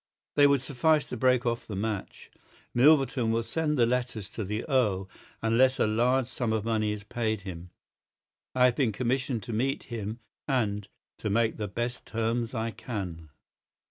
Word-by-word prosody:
They 145 -1 +6
would 140 -2 +2
suffice 145 +3 +2
to - - -4
break 125 +1 +3
off 120 -1 -1
the 105 - -5
match. 105 0 -4 0.4
Milverton 130 -3 +4
will 115 +1 +1
send 150 +2 -1
the 120 - +5
letters 120 -4 -2
to 110 - -4
the 105 +3 -3
Earl 105 -9 +1 0.4
unless 130 +4 +4
a - - +3
large 120 +4 +2
sum 120 -2 -2
of 110 -1 -1
money 110 -2 +1
is 105 -1 -5
paid 110 0 -2
him. 90 -2 -8 0.9
I 125 0 +5
have 125 -1 +4
been 125 -6 +1
commissioned 125 +1 -1
to 120 - -5
meet 135 +5 0
him, 110 0 -4 0.3
and—to 105 -5 -3
make 110 +2 +2
the 105 - -3
best 120 +4 -4
terms 115 +2 -1
I 115 0 -1
can." 90 -10 -6
115 Hz, 170 wpm, -28 LUFS, 110-125 Hz, 0.9 s, They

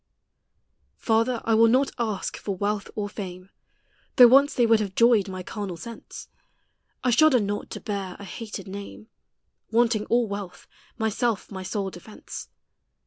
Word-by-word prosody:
Father, 230 +1 +1
I 225 - +2
will 225 +1 +6
not 260 +4 +3
ask 215 -5 -2
for 200 - -4
wealth 205 +2 -2
or 210 -1 -2
fame, 185 -2 -8 0.6
Though 245 -2 +9
once 275 +3 +5
they 240 - +4
would 225 -1 +4
have 200 -3 -3
joyed 230 -4 +4
my 185 -1 -6
carnal 195 -3 -5
sense: 230 +7 -9 0.8
1 250 - +2
shudder 280 +1 +5
not 205 -1 -3
to - - -6
bear 200 -4 -4
a - - -10
hated 205 0 -7
name, 200 +3 -9 0.6
Wanting 225 -2 +2
all 240 0 +3
wealth, 200 -2 -7 0.3
myself 220 -1 -1
my 190 -1 -6
sole 195 0 -3
defence. 185 +5 -10
215 Hz, 150 wpm, -25 LUFS, 195-235 Hz, 0.8 s, Though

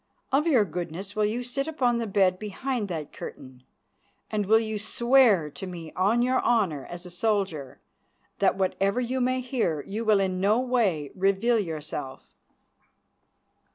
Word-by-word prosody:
Of 290 +5 +2
your 250 -10 +4
goodness 180 +3 -6
will 215 0 +2
you 235 +4 -2
sit 275 +4 -3
upon 250 -7 +1
the 230 - -2
bed 190 -2 +2
behind 215 +2 -3
that 160 -5 -5
curtain, 130 -1 -9 0.7
and 210 -2 -1
will 220 +2 +6
you 220 -1 -2
swear 235 - +4
to 190 - -7
me 170 -3 -8
on 205 +7 +2
your 255 +1 +2
honour 195 - +1
as 175 +1 -8
a 180 - -9
soldier 175 - -1 0.6
that - - +3
whatever 195 +3 0
you 250 +1 -1
may 255 +1 +1
hear 230 - -1
you 215 +3 -4
will 215 -2 +4
in 185 -1 -1
no 210 +4 +3
way 215 - 0
reveal 200 +5 +2
yourself?" 150 -6 -5
205 Hz, 155 wpm, -26 LUFS, 180-240 Hz, 0.7 s, will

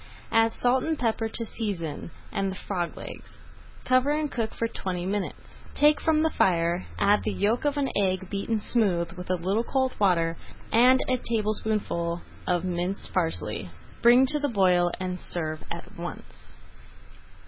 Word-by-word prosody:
Add 225 0 +4
salt 250 +1 +2
and 320 -1 -1
pepper 225 -2 0
to 230 +1 -5
season, 185 -10 -4 0.2
and 195 0 -1
the - - -6
frog 180 -3 -3
legs. - - -10 0.5
Cover 255 +2 +3
and 300 0 0
cook 225 -3 -2
for 230 - 0
twenty 180 -5 -4
minutes. 200 +1 -4
Take 295 +1 +4
from 315 -1 +3
the 320 - +2
fire, 170 0 +1
add 205 +1 +4
the - - -1
yolk 220 +7 0
of 290 0 +1
an 280 -1 +1
egg 190 -2 +1
beaten 200 +4 -1
smooth 190 -7 +1
with 180 -1 -9
a 185 - +2
little 190 +6 0
cold 260 +1 0
water, 170 -4 +2 0.3
and 250 +3 +6
a 255 -1 +1
tablespoonful 210 -6 -1 0.2
of 175 0 +1
minced 180 +2 -3
parsley. 165 -3 -1 0.3
Bring 245 +2 +7
to 295 +3 +2
the 290 0 0
boil, 180 -5 +3
and 185 -1 -3
serve 155 -3 -4
at - - -7
once. - - -8
205 Hz, 160 wpm, -27 LUFS, 180-245 Hz, 0.5 s, Bring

